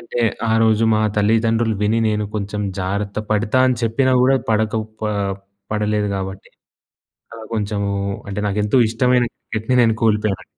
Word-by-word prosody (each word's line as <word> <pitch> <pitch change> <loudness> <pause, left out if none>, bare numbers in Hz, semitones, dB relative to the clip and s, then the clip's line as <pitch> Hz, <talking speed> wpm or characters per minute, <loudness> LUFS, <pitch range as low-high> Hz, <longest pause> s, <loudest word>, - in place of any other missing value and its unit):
అంటే 120 +1 -4 0.3
ఆ - - +3
రోజు 110 0 +3
మా 110 - +2 0.2
తల్లిదండ్రులు 115 +1 +2
విని 110 +2 +2
నేను 105 -1 0
కొంచెం 105 0 -3 0.2
జాగ్రత్త 100 +2 -2
పడతా 110 +4 +2
అని 125 - +1
చెప్పినా 130 +4 +1
గూడా 135 +1 +4
పడక 110 +1 +1 0.3
ప - - -1 0.7
పడలేదు 105 -1 0
గాబట్టి 95 0 -6 0.8
అలా 115 -1 -9
కొంచెము 100 -2 -1 0.4
అంటే 100 +1 -3
నాకెంతో 105 +5 +1
ఇష్టమైన 125 +1 +2
క్రికెట్‌ని 110 +3 -2
నేను 115 -1 +3
కోల్పోయానండి. 105 -3 +1
110 Hz, 140 wpm, -20 LUFS, 105-115 Hz, 0.8 s, గూడా